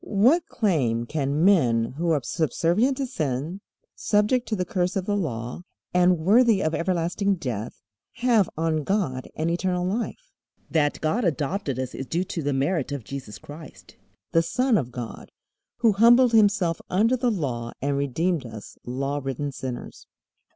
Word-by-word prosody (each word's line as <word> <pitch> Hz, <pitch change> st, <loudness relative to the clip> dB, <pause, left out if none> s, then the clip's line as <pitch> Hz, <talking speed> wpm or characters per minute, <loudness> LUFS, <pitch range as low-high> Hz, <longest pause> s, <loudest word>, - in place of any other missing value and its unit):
What 245 Hz, -, +3 dB
claim 130 Hz, -, 0 dB
can 145 Hz, +3 st, 0 dB
men 120 Hz, -13 st, +3 dB
who 170 Hz, +3 st, -1 dB
are 150 Hz, -5 st, +1 dB
subservient 175 Hz, -, +1 dB
to 275 Hz, -, -1 dB
sin, 155 Hz, -, -3 dB, 0.3 s
subject 210 Hz, +4 st, +1 dB
to 220 Hz, -, -1 dB
the 180 Hz, -2 st, -1 dB
curse 180 Hz, -4 st, -1 dB
of 190 Hz, -2 st, -1 dB
the 205 Hz, -, 0 dB
Law, 125 Hz, -, -3 dB, 0.3 s
and 180 Hz, 0 st, +4 dB
worthy 210 Hz, +5 st, +4 dB
of 155 Hz, -, 0 dB
everlasting 180 Hz, +3 st, 0 dB
death, 120 Hz, -, -5 dB, 0.3 s
have 230 Hz, -6 st, +2 dB
on 160 Hz, -1 st, 0 dB
God 145 Hz, -9 st, -1 dB
and 160 Hz, +2 st, -1 dB
eternal 180 Hz, 0 st, -1 dB
life? 240 Hz, -, -3 dB, 0.4 s
That 150 Hz, -3 st, +1 dB
God 205 Hz, +10 st, 0 dB
adopted 150 Hz, -, -1 dB
us 130 Hz, -1 st, -4 dB
is 135 Hz, -, -6 dB
due 175 Hz, +2 st, 0 dB
to 175 Hz, -2 st, -4 dB
the 145 Hz, -1 st, -1 dB
merit 140 Hz, +2 st, 0 dB
of 140 Hz, -4 st, -4 dB
Jesus 130 Hz, -5 st, -7 dB
Christ, 150 Hz, 0 st, -12 dB, 0.4 s
the 165 Hz, -, +4 dB
Son 250 Hz, +8 st, +1 dB
of 130 Hz, -, 0 dB
God, 120 Hz, -2 st, -7 dB, 0.5 s
who 230 Hz, -2 st, +5 dB
humbled 235 Hz, +4 st, +6 dB
Himself 200 Hz, -6 st, +3 dB
under 220 Hz, +7 st, +3 dB
the 250 Hz, 0 st, +1 dB
Law 125 Hz, -, -2 dB
and 140 Hz, +1 st, -1 dB
redeemed 145 Hz, +4 st, 0 dB
us 110 Hz, -4 st, -10 dB
law 135 Hz, +3 st, -3 dB
ridden 135 Hz, +2 st, -3 dB
sinners. 130 Hz, -2 st, -7 dB
165 Hz, 160 wpm, -25 LUFS, 135-205 Hz, 0.5 s, humbled